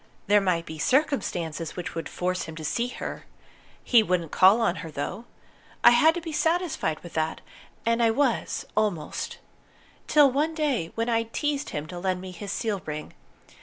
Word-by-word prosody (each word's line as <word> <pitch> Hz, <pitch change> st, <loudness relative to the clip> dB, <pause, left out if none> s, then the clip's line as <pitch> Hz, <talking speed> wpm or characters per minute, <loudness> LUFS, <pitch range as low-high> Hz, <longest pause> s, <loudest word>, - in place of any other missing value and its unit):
There 205 Hz, +1 st, +5 dB
might 175 Hz, -3 st, 0 dB
be 160 Hz, -1 st, -8 dB
circumstances 175 Hz, -, 0 dB
which 180 Hz, -, -5 dB
would 165 Hz, -, -5 dB
force 180 Hz, 0 st, -2 dB
him 160 Hz, -, -8 dB
to 160 Hz, -1 st, -7 dB
see 235 Hz, +10 st, 0 dB
her. 250 Hz, -, -6 dB, 0.6 s
He 240 Hz, -3 st, +6 dB
wouldn't 180 Hz, -6 st, -1 dB
call 195 Hz, +5 st, +6 dB
on 190 Hz, -6 st, +1 dB
her, 165 Hz, +1 st, -6 dB
though. 180 Hz, +9 st, -5 dB, 0.6 s
I -, -, +9 dB
had 310 Hz, +7 st, +5 dB
to 345 Hz, -, -3 dB
be 325 Hz, -1 st, -6 dB
satisfied 320 Hz, -, 0 dB
with 175 Hz, -, -11 dB
that, 160 Hz, 0 st, -1 dB, 0.5 s
and 230 Hz, +1 st, +2 dB
I 230 Hz, -, +5 dB
was 255 Hz, +1 st, 0 dB
almost, 200 Hz, -8 st, -1 dB, 0.7 s
till 290 Hz, -3 st, +6 dB
one 305 Hz, +5 st, 0 dB
day 270 Hz, -, 0 dB
when 230 Hz, +1 st, -1 dB
I'd 230 Hz, -1 st, 0 dB
teased 295 Hz, -1 st, -1 dB
him 150 Hz, 0 st, -4 dB
to 175 Hz, +2 st, -7 dB
lend 185 Hz, 0 st, -1 dB
me 185 Hz, 0 st, -7 dB
his 195 Hz, +2 st, -7 dB
seal 205 Hz, -3 st, -2 dB
ring. 150 Hz, 0 st, -5 dB
205 Hz, 180 wpm, -26 LUFS, 170-250 Hz, 0.7 s, I